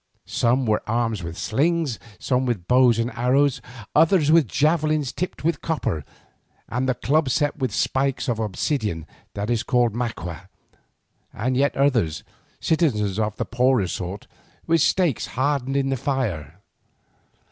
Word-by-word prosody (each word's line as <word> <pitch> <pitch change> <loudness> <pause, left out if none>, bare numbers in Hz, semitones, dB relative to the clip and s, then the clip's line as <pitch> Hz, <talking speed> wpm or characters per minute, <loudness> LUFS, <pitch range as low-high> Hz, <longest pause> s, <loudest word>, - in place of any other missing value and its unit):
Some 125 +2 +1
were 110 -1 +1
armed 115 -2 0
with 85 0 -6
slings, 150 0 0 0.2
some 130 +5 0
with 100 -8 -2
bows 125 -1 +5
and 115 +1 -1
arrows, 125 +4 +2 0.3
others 160 -1 +4
with 160 -5 +5
javelins 155 - +1
tipped 180 -3 -4
with 165 -2 0
copper, 140 - -2 0.6
and 125 +3 -1
the 130 - +1
club 145 +3 +1
set 145 +3 0
with 130 -5 -1
spikes 135 +6 0
of 120 -3 -1
obsidian 105 - -2 0.3
that 105 +3 -2
is 115 -2 +1
called 120 -3 +2
maqua, 95 -7 -5 0.8
and 130 +3 -2
yet 140 +2 +1
others, 120 - +1 0.4
citizens 110 - +1
of 105 -1 -1
the - - -2
poorer 125 -4 +2
sort, 90 +3 -5 0.4
with 165 -1 +3
stakes 175 - +2
hardened 135 0 0
in 135 -1 +1
the 135 - 0
fire. 105 - -3
125 Hz, 145 wpm, -23 LUFS, 110-145 Hz, 0.8 s, bows